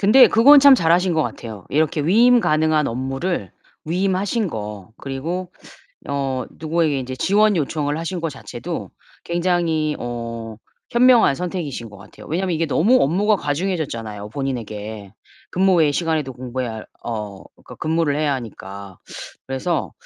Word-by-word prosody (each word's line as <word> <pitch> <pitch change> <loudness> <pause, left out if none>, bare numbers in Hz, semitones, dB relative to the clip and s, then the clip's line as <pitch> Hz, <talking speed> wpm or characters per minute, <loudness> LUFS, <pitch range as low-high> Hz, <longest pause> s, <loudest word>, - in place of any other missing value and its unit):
근데 215 +6 +7
그건 275 +6 +7
참 280 -1 +8
잘하신 175 -3 +2
것 160 - +2
같아요. 110 -9 -7
이렇게 155 +1 +1
위임 235 +9 +5
가능한 155 -3 +2
업무를 135 - -3 0.4
위임하신 195 +5 0
거, 105 - -7
그리고 165 +7 -4 0.6
어 135 -2 -2
누구에게 160 -2 0
이제 130 0 -5
지원 205 +5 +3
요청을 150 -1 -1
하신 170 +2 -4
거 165 - -1
자체도 - - -7 0.3
굉장히 170 -3 0
어 115 -2 -6 0.3
현명한 240 - +5
선택이신 150 - -5
것 105 - -13
같아요. - - -14
왜냐면 180 +2 -1
이게 165 +1 0
너무 215 - +3
업무가 200 +9 +2
과중해졌잖아요, 145 - -3
본인에게. 110 -6 -5 0.4
근무 190 0 +3
외 155 -4 +3
시간에도 155 -4 -1
공부해야할 125 -3 -5 0.2
어 105 -4 -4
그러니까 - - -15
근무를 160 -2 0
해야 150 -1 +1
하니까. 100 -5 -8 0.5
그래서 135 +5 -2
155 Hz, 340 characters per minute, -21 LUFS, 125-180 Hz, 0.6 s, 참